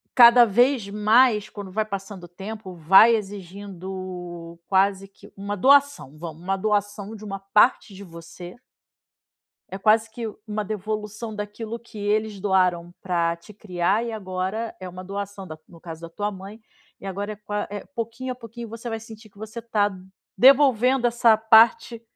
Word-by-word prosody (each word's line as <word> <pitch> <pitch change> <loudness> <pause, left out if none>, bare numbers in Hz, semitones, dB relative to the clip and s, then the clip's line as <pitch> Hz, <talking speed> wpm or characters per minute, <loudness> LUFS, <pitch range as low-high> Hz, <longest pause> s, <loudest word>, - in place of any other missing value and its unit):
cada 240 -1 +8
vez 240 0 +2
mais, 215 +1 +3
quando 200 -2 -9
vai 215 +2 -1
passando 195 -2 -7
o - - -9
tempo, 195 +2 -8
vai 190 +8 +6
exigindo 185 -3 -7
quase 195 0 +1
que 195 +1 -18
uma 200 +1 -4
doação, 275 - +3
vamos 165 -1 -8
uma 195 +2 -1
doação 205 +1 -2
de 215 - -12 0.3
parte 210 -1 +4
de 195 +1 -10
você. 170 +1 -11 1.1
É 190 - -6
quase 220 +3 +3
que 230 +1 -6 0.2
uma 215 0 -3
devolução 215 +1 -5
daquilo 215 +2 -6
que 235 -1 -15
eles 210 0 -1
doaram 180 -3 +1
pra 170 -2 0
te 170 +5 -16
criar 195 0 -1
e 230 - -5
agora 195 +2 -4
é 185 - -7
uma 180 +1 -9
doação 200 0 -6
da 155 -2 -10
no 165 -2 -17
caso 165 -2 -9
da 170 - -8
tua 205 +5 -3
mãe, 195 +3 -11 0.4
e - - -10
agora 200 +2 -4
é - - -11
qua 210 0 -4
eh, 205 0 -7
pouquinho 235 +2 -5
a - - -5
pouquinho 235 -1 -10
você 230 +2 -8
vai 225 -1 -4
sentir 220 -1 -13
que 200 - -26
você 220 +2 -8
tá 210 -3 0 0.5
devolvendo 260 -2 +5
essa 235 -1 +4
parte 225 +1 +4
205 Hz, 165 wpm, -23 LUFS, 190-225 Hz, 1.1 s, cada